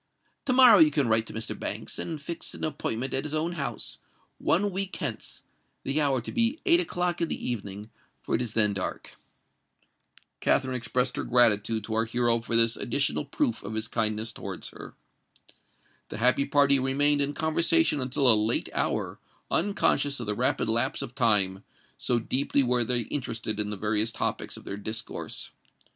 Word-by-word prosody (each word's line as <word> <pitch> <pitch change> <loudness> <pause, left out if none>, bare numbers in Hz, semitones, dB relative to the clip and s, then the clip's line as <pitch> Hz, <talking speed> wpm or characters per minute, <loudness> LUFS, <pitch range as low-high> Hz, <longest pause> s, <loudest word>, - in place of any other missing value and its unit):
To 255 - +1
morrow 250 -5 +8
you 160 -2 +7
can 145 -3 +1
write 110 0 +2
to - - -9
Mr. 110 +1 -4
Banks, - - -4
and 160 -3 -4
fix 165 +3 -5
an - - -9
appointment 130 -5 -2
at 135 - 0
his 155 0 -3
own 160 +3 -1
house—one 175 +4 -3
week 190 +1 -3
hence—the 140 +3 -5
hour 135 -4 +1
to - - -7
be 235 +6 +1
eight 345 -2 +6
o'clock 175 - -1
in 170 - +1
the - - -4
evening, 105 -1 -6 0.3
for - - -4
it - - +2
is 120 -3 -4
then 105 -2 +3
dark." 95 -2 -5 1.2
Katherine 130 -1 +1
expressed 125 +1 -1
her - - -2
gratitude 115 -3 +3
to 110 - -5
our 110 +1 +1
hero 120 0 +1
for 115 0 -3
this 115 0 +4
additional - - -1
proof 115 - -1
of 110 - -6
his 110 +1 -1
kindness 110 0 -2
towards - - -7
her. - - -11 1.1
The - - -6
happy 125 +4 +3
party 140 -1 +4
remained 145 +2 +2
in 140 +1 0
conversation 160 - +2
until 130 +1 +1
a 120 - +11
late 110 +2 +1
hour—unconscious 145 -8 -1
of 120 - -4
the 105 - -1
rapid 105 - 0
lapse 115 +5 0
of 125 -3 -8
time, 105 -6 +2 0.4
so 120 - +1
deeply 135 +4 +1
were 125 -1 +1
they 120 +1 0
interested 115 -4 -4
in 105 0 0
the 105 - -4
various 105 +2 0
topics - - -3
of - - -12
their 100 - -6
discourse. 110 +2 -5
125 Hz, 175 wpm, -27 LUFS, 110-145 Hz, 1.2 s, a